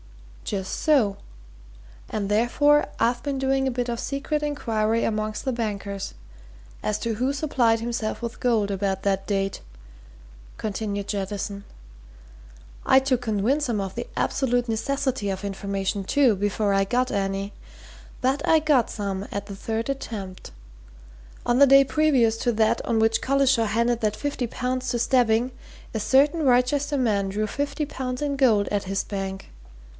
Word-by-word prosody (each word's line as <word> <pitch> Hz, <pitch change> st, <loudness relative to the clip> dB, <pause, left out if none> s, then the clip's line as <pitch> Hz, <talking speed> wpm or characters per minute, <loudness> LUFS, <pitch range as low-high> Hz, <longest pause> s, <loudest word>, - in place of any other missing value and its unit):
"Just 190 Hz, -2 st, -3 dB
so 245 Hz, -11 st, +3 dB, 0.9 s
and 210 Hz, -2 st, -2 dB
therefore 245 Hz, +8 st, +3 dB
I've 240 Hz, +1 st, +1 dB
been 280 Hz, -2 st, -2 dB
doing 270 Hz, 0 st, +1 dB
a -, -, 0 dB
bit 245 Hz, 0 st, -2 dB
of 235 Hz, -1 st, -3 dB
secret 295 Hz, +2 st, -2 dB
inquiry 230 Hz, -6 st, 0 dB
amongst 215 Hz, 0 st, -2 dB
the 260 Hz, -, 0 dB
bankers, 200 Hz, -4 st, -4 dB, 0.7 s
as 215 Hz, 0 st, 0 dB
to 230 Hz, +1 st, -2 dB
who 250 Hz, +5 st, 0 dB
supplied 260 Hz, -6 st, +1 dB
himself 230 Hz, -1 st, -3 dB
with 235 Hz, -1 st, -6 dB
gold 225 Hz, -5 st, +2 dB
about 195 Hz, -1 st, -1 dB
that 195 Hz, -1 st, 0 dB
date," 195 Hz, -1 st, -1 dB, 1.0 s
continued 205 Hz, -1 st, -3 dB
Jettison. 200 Hz, 0 st, -3 dB, 1.2 s
"I'd 265 Hz, 0 st, +5 dB
to 260 Hz, -2 st, +3 dB
convince 245 Hz, +5 st, 0 dB
'em 220 Hz, -3 st, 0 dB
of 195 Hz, -1 st, -4 dB
the 240 Hz, 0 st, -4 dB
absolute 245 Hz, -2 st, +1 dB
necessity 250 Hz, -1 st, -1 dB
of 190 Hz, +1 st, -3 dB
information, 195 Hz, 0 st, -2 dB
too, 250 Hz, +2 st, +3 dB
before 205 Hz, +1 st, 0 dB
I 195 Hz, 0 st, +3 dB
got 250 Hz, +5 st, 0 dB
any! 195 Hz, 0 st, -2 dB, 0.7 s
But 265 Hz, +3 st, +1 dB
I 320 Hz, -, +5 dB
got 295 Hz, -6 st, +2 dB
some 200 Hz, -1 st, -4 dB
at 200 Hz, 0 st, -4 dB
the 200 Hz, -1 st, -8 dB
third 225 Hz, +3 st, -3 dB
attempt. 215 Hz, -9 st, -5 dB, 0.9 s
On 240 Hz, +1 st, +2 dB
the 280 Hz, -, +8 dB
day 275 Hz, +1 st, +7 dB
previous 270 Hz, -7 st, +3 dB
to 240 Hz, -, 0 dB
that 220 Hz, 0 st, +2 dB
on 230 Hz, -2 st, +1 dB
which 225 Hz, 0 st, +2 dB
Collishaw 265 Hz, -4 st, +2 dB
handed 235 Hz, +2 st, +1 dB
that 215 Hz, -1 st, 0 dB
fifty 280 Hz, -4 st, -2 dB
pounds 255 Hz, +2 st, -2 dB
to 240 Hz, -, 0 dB
Stebbing, 240 Hz, 0 st, +2 dB, 0.4 s
a 220 Hz, -, -1 dB
certain 285 Hz, +8 st, +3 dB
Wrychester 275 Hz, +3 st, +2 dB
man 205 Hz, -6 st, +1 dB
drew 210 Hz, +2 st, -1 dB
fifty 285 Hz, +6 st, -2 dB
pounds 255 Hz, -2 st, -4 dB
in 290 Hz, -1 st, -1 dB
gold 225 Hz, -7 st, +3 dB
at 205 Hz, -1 st, -1 dB
his 195 Hz, +1 st, -1 dB
bank. 195 Hz, -1 st, -5 dB
230 Hz, 155 wpm, -24 LUFS, 205-265 Hz, 1.2 s, the